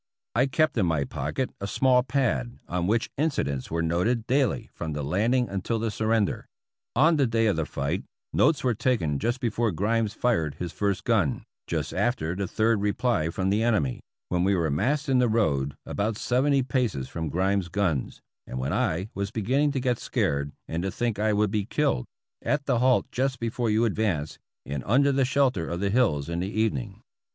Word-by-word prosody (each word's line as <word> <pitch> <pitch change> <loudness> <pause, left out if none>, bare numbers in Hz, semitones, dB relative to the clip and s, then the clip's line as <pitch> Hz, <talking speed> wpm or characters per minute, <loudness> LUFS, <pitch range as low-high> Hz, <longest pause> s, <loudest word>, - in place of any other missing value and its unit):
I 125 +5 +3
kept 155 -2 +1
in 95 - +2
my 80 -4 +1
pocket 75 - -3
a 100 - -2
small 125 +3 +3
pad 125 -2 -1
on 90 0 -1
which 115 +3 +1
incidents 70 - -1
were 85 +1 -1
noted 90 +8 +1
daily 130 -1 +1
from 80 -2 -4
the 75 0 -3
landing 115 - +1
until 100 +4 -2
the 110 0 -1
surrender. 110 -1 0 0.5
On 155 +6 +5
the 140 -3 +3
day 115 0 +1
of 105 - +2
the 80 -2 -1
fight 70 +1 -2 0.3
notes 150 +1 +3
were 125 -2 +2
taken 100 - 0
just 120 - -1
before 115 -1 0
Grimes 105 +4 0
fired 80 - 0
his 90 -2 -5
first 100 -2 -1
gun, 100 - +1 0.2
just - - -2
after 115 -9 0
the 100 0 -2
third 110 +1 +1
reply 105 -5 +1
from 95 +3 -1
the 105 +2 +2
enemy 100 - +1
— - - -66
when 90 -1 +1
we 100 +1 +3
were 80 -4 0
massed 140 - 0
in 130 -2 +3
the 125 -2 +3
road 70 -11 +1
about 105 +1 -2
seventy 135 +3 +2
paces 125 - -1
from 80 +2 -4
Grimes' 95 +3 +1
guns, 85 -7 -1 0.3
and 65 - -5
when 65 +2 -2
I 90 +6 0
was 100 0 -2
beginning 130 +8 +1
to 135 - 0
get 125 -2 0
scared 70 - -1 0.2
and 80 +1 -2
to 95 - -1
think 115 0 -2
I 110 +1 +2
would 105 -1 +2
be 105 -2 0
killed 140 - 0 0.2
— - - -65
at 140 +4 0
the 125 -4 +2
halt 130 +1 +3
just 130 0 -1
before 115 0 -1
you 110 +2 +3
advanced, 95 -9 -1 0.3
and 70 -1 -3
under 140 +6 +4
the 135 -1 +2
shelter 130 -10 +1
of 85 - -3
the 100 0 0
hills 100 - +2
in 85 0 -2
the 95 +2 -2
evening. 110 - -2
110 Hz, 200 wpm, -26 LUFS, 85-125 Hz, 0.5 s, On